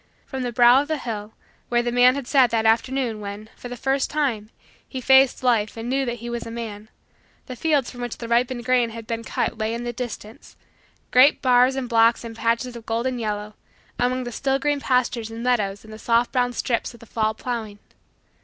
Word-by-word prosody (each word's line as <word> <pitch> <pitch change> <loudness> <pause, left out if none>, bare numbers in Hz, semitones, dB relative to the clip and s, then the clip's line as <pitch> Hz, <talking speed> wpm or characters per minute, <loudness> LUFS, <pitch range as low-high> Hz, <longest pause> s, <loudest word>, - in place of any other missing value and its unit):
From 265 -1 -5
the 245 -1 -2
brow 240 +2 +6
of 290 - -6
the 315 0 -1
hill, 220 -5 -6 0.4
where 240 0 +2
the 240 - -1
man 245 +1 +5
had 280 -2 -4
sat 260 -1 +4
that 225 -1 0
afternoon 235 0 +1
when, 205 +1 -7
for 245 - -9
the 245 - -6
first 270 +2 0
time, 250 -9 -1 0.4
he 265 - -5
faced 265 +1 +4
Life 230 -4 +1
and 225 +1 -5
knew 270 0 +1
that 240 -1 -2
he 235 0 -9
was 235 -1 -4
a - - -6
man, 220 -2 -7 0.6
the 255 - -7
fields 290 -1 +1
from 245 - -10
which 245 -2 -4
the 235 - -7
ripened 240 +1 0
grain 250 -2 +2
had 225 0 -9
been 230 0 -4
cut 230 - -2
lay 220 +1 -1
in 235 - -5
the 240 0 -4
distance, 230 -2 -8 0.6
great 260 +4 +6
bars 255 0 +4
and 265 -2 -3
blocks 230 0 +3
and 230 -1 -8
patches 235 +2 -1
of 230 -1 -10
golden 240 +2 -1
yellow, 210 -1 -3 0.5
among 255 +1 0
the 245 - -6
still 270 +3 0
green 290 +1 0
pastures 250 -4 0
and 225 +1 -7
meadows 210 -6 0
and 220 0 -12
the 215 - -10
soft 235 +1 +2
brown 245 -1 +1
strips 235 0 -2
of - - -16
the 230 - -14
fall 220 -1 -1
plowing. 220 -4 -5
240 Hz, 220 wpm, -23 LUFS, 225-255 Hz, 0.6 s, brow